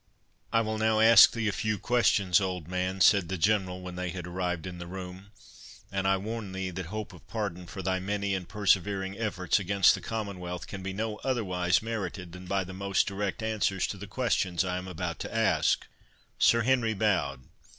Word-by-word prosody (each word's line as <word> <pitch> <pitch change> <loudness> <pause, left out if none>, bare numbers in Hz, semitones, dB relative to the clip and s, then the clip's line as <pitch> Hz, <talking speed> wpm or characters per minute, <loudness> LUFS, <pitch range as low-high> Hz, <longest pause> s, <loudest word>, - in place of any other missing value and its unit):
"I 115 - +3
will 110 -1 -2
now 110 0 +2
ask 110 -1 +9
thee 115 -2 -2
a - - +2
few 110 +1 -1
questions, 100 -5 +3
old 90 -4 -3
man," 90 +1 -2
said 90 0 +5
the 95 - -2
General, 95 0 +1
when 90 -1 -7
they 90 0 -2
had 90 0 -6
arrived 90 -2 -3
in 90 -1 -7
the 85 - -7
room; 95 +1 -8 0.6
"and 95 0 -1
I 95 0 +3
warn 105 0 -5
thee, 95 -1 -3
that 90 -1 -5
hope 110 +3 -5
of - - -16
pardon 95 -5 -4
for 95 +2 -7
thy 95 +1 0
many 100 +1 -2
and 95 -3 -4
persevering 100 -1 +1
efforts 100 -4 0
against 100 0 +4
the - - -4
Commonwealth, 95 -5 -5
can 95 - -7
be 95 +1 -4
no 110 +2 -3
otherwise 90 -9 0
merited 95 -6 -4
than 90 +1 -10
by 95 0 0
the 95 +1 -9
most 100 +1 +1
direct 100 +2 -3
answers 105 -4 0
to 100 - -5
the 100 +1 -8
questions 95 -6 0
I 90 0 -2
am 90 - -8
about 90 -4 -4
to - - -6
ask." - - +2 0.5
Sir 115 -1 +5
Henry 120 -3 +2
bowed. 95 -10 0
95 Hz, 200 wpm, -29 LUFS, 90-105 Hz, 0.6 s, ask